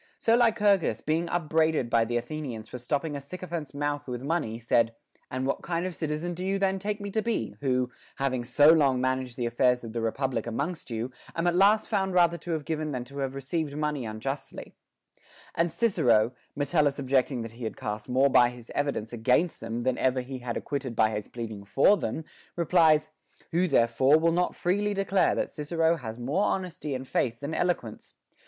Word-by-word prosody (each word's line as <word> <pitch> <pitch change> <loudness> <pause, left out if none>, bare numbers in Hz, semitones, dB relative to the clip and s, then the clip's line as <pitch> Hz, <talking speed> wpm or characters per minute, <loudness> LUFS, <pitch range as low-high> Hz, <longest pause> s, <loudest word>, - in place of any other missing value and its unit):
So 230 - +3
Lycurgus, 210 -6 +3
being 165 +3 -1
upbraided 160 -4 +1
by 115 -1 +4
the 120 +1 -1
Athenians 120 -3 -5
for 125 - -7
stop 140 +5 -1
ping 155 -3 -4
a 140 - -4
sycophant's 165 -1 -6
mouth 145 0 -2
with 125 0 -5
money, 145 -7 -1
said: 115 0 +1 0.3
And 130 +1 -2
what 140 - -1
kind 170 0 -2
of 185 -2 -4
citizen 155 +2 -3
do 180 +2 -6
you 195 +1 0
then 195 0 +1
take 210 +2 -3
me 200 0 -5
to 220 - 0
be, 215 - -2
who, 125 -2 0 0.2
having 130 -3 -1
so 145 +5 +6
long 140 -6 +4
managed 130 -1 -1
the 120 - -1
affairs 125 +1 +2
of 115 -1 -7
the 115 - -2
republic 120 0 -1
amongst 140 +9 -3
you, 115 +2 -3 0.2
am 165 - -1
at 175 0 +2
last 205 +4 +4
found 190 -3 0
rather 170 -1 +4
to 175 - -10
have 155 -3 -3
given 155 -1 -2
than 125 -3 -3
to 140 +3 -9
have 135 -1 -2
received, 145 +2 -3
money 150 -3 -1
unjustly 115 +6 -5 0.4
\ - - -25
And 165 0 +1
Cicero, 125 - +3 0.2
Metellus 145 0 +1
objecting 130 -2 +1
he 115 +2 -9
had 110 - -5
cast 105 +2 -5
more 130 +3 +4
by 120 -1 +6
his 120 -1 -12
evidence 140 -6 -2
against 125 +9 +1
them 115 +1 -4
than 125 +1 0
ever 130 0 +2
he 130 +1 -7
had 120 -1 -4
ac - - -5
quitted 135 -4 -3
by 110 -1 +3
his 105 -1 -4
pleading 110 -4 -6
for 135 - +4
them, 160 -5 -4 0.3
replies: 160 -3 +3 0.4
Who 180 +2 +2
therefore 130 +1 +4
will 165 +1 +2
not 180 +1 0
freely 205 +3 0
declare 195 -1 +2
that - - -2
Cicero 165 +2 +1
has 115 -6 -7
more 140 +11 0
honesty 170 -6 -2
and 130 +1 -6
faith 120 -1 -1
than 145 +3 -4
eloquence 160 -11 -2
140 Hz, 200 wpm, -28 LUFS, 125-170 Hz, 0.4 s, so